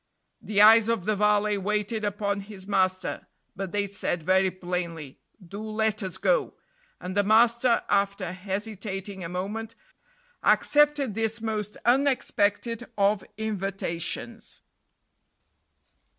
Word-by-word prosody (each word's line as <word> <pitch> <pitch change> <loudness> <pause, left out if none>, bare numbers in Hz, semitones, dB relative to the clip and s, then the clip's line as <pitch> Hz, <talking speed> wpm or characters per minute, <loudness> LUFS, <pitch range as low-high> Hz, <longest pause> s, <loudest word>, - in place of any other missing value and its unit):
The 210 -1 +3
eyes 220 +1 +8
of 225 -6 0
the 215 0 +1
valet 210 0 +2
waited 210 +2 -1
upon 205 -1 -1
his 200 -1 -10
master, 185 -2 0 0.3
but 195 -1 -5
they 205 -1 0
said 190 -4 -3
very 190 +2 +3
plainly, 175 -5 -5 0.3
"Do 200 +4 -7
let 220 0 -1
us 190 -3 -4
go;" - - +1 0.4
and 185 +1 -6
the 205 - +4
master, 235 +3 +4
after 200 -2 0
hesitating 195 0 -5
a 165 - -5
moment, 210 +5 -4 0.7
accepted 295 -5 +3
this 225 +1 -1
most 215 -2 -3
unexpected 240 -3 +1
of 200 -1 +2
invitations. 195 -5 -4
205 Hz, 115 wpm, -26 LUFS, 190-220 Hz, 0.7 s, eyes